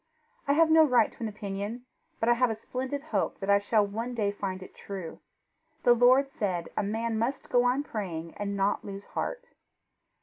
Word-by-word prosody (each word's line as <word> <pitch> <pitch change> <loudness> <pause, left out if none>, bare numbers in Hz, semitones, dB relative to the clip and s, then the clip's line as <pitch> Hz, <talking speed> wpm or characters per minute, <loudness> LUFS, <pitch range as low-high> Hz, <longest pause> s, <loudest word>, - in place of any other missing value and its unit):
I 280 - +4
have 320 +1 +4
no 320 0 +8
right 250 -7 +4
to - - -21
an 230 - -2
opinion, 205 +3 -5 0.3
but 225 - 0
I 240 - +6
have 250 +1 +2
a 225 - -1
splendid 260 +5 -4
hope 315 - -1
that 195 0 0
I 200 - +6
shall 205 +1 +2
one 230 +5 -4
day 205 -3 +1
find 190 -2 -4
it - - -13
true. 190 -5 -7 0.6
The 240 - +7
Lord 250 +3 +5
said 185 -8 -2
a - - +1
man 220 +2 -1
must 245 +5 -2
go 245 0 +4
on 255 +3 +2
praying 170 - -5
and 200 -1 -3
not 195 +1 +1
lose 200 0 -7
heart." - - -4
220 Hz, 200 wpm, -28 LUFS, 200-250 Hz, 0.6 s, no